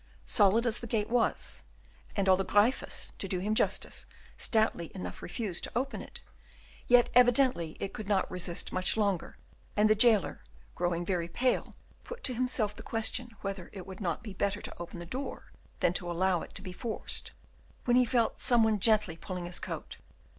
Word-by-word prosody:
Solid 215 +2 +5
as 235 -1 +2
the 235 - -7
gate 215 0 -1
was, 245 -1 +1 0.5
and 200 -2 0
although 190 0 +5
Gryphus, 210 +7 +1
to 195 - -4
do 185 - -1
him 205 +4 -1
justice, - - 0 0.3
stoutly 220 -7 +1
enough 90 0 -6
refused 180 -1 -4
to - - -9
open 265 +3 -1
it, - - -7 0.7
yet 245 -1 +5
evidently 245 - +4
it 195 - -4
could 215 - -6
not 200 -3 +1
resist 180 -1 -2
much 185 +3 +1
longer, 200 -5 0 0.4
and 210 +1 +5
the 215 - +6
jailer, 215 -2 +4 0.3
growing 175 0 -1
very 175 -2 -1
pale, 250 +8 0 0.3
put 485 0 -9
to 255 - +2
himself 240 -4 0
the - - -9
question 225 +1 -1
whether 195 -3 -5
it 190 -3 -8
would 190 +1 -9
not 175 +1 -2
be 210 -4 -7
better 200 +2 -1
to - - -7
open 175 +1 -7
the 170 - -7
door 260 +11 -6 0.3
than 175 - +3
to 175 -1 0
allow 180 +1 +1
it - - -10
to 200 - -5
be 185 -2 -7
forced, 225 +4 -3 0.5
when 245 - +3
he 250 - +6
felt 235 -1 +1
some 240 -2 +5
one 220 -1 +2
gently 210 -4 +3
pulling 180 +1 -6
his 175 0 -2
coat. - - -6
205 Hz, 185 wpm, -30 LUFS, 180-235 Hz, 0.7 s, the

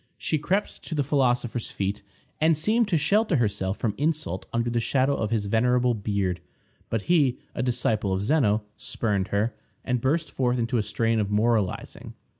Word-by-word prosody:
She 155 - -1
crept 190 +7 -1
to 160 - -4
the 145 - +1
philosopher's 125 -4 0
feet, 100 +1 -3 0.4
and 160 0 +3
seemed 215 +8 +2
to 180 -5 +2
shelter 200 +5 +2
herself 100 -5 0
from 110 -4 -1
insult 150 - -1
under 120 0 0
the 120 - +1
shadow 130 +4 +2
of 110 - -2
his 110 -2 0
venerable 125 +3 +2
beard; 100 -5 -1 0.5
but 115 -2 -1
he, 145 -8 +3 0.2
a - - -3
disciple 115 -5 0
of 95 +1 0
Zeno, 110 -5 +2
spurned 100 -4 -1
her, 105 +3 0 0.3
and 125 -2 0
burst 155 +5 0
forth 125 -1 0
into 115 0 0
a - - +2
strain 115 +2 0
of 100 -2 -1
moralizing. 105 -2 -1
120 Hz, 175 wpm, -26 LUFS, 105-145 Hz, 0.5 s, and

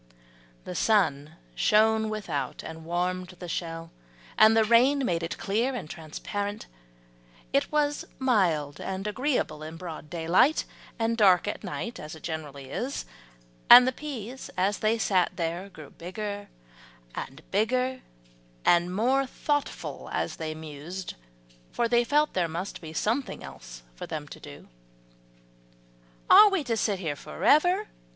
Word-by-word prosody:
The - - -6
sun 160 -8 +1 0.2
shone 220 - +3
without 165 -12 -4
and 160 0 -8
warmed 180 +2 -2
the 175 - -8
shell, 165 -1 -4 0.4
and 220 +1 +6
the 225 - +6
rain 255 +5 +4
made 170 -5 0
it 165 - -4
clear 230 +7 0
and 235 - -5
transparent; 200 +6 -5 0.9
it - - +1
was 295 -1 +1
mild 170 - +1
and 190 +1 -4
agreeable 210 - -1
in 160 +1 -7
broad 165 -3 -8
daylight, 175 - +3 0.3
and 230 -1 0
dark 190 -5 +5
at - - -4
night, 230 +5 -5
as 150 +1 -8
it 160 - -14
generally 145 -5 -6
is; 270 +3 -3 0.6
and 250 +1 +11
the - - +3
peas 260 -3 -7
as 195 +3 +1
they 220 +1 +2
sat 190 -5 +2
there 170 +3 -3
grew 155 -6 -12
bigger 205 +3 -6 0.6
and 135 +4 -7
bigger, 255 +5 +1 0.6
and 175 +1 +3
more 260 +6 +2
thoughtful 290 +2 -3
as - - -2
they 155 -1 -4
mused, 160 +4 -7 0.6
for 235 - 0
they 240 +1 +3
felt 295 +4 +2
there 180 -2 +1
must 170 +5 -5
be 160 -2 -8
something 225 - -1
else - - -11
for - - -8
them - - -5
to - - -10
do. 70 - -12 1.6
"Are 425 - +9
we 390 -6 0
to 235 -4 -1
sit 210 -2 0
here 160 -6 -3
forever?" 355 - +2
190 Hz, 145 wpm, -27 LUFS, 160-235 Hz, 1.6 s, and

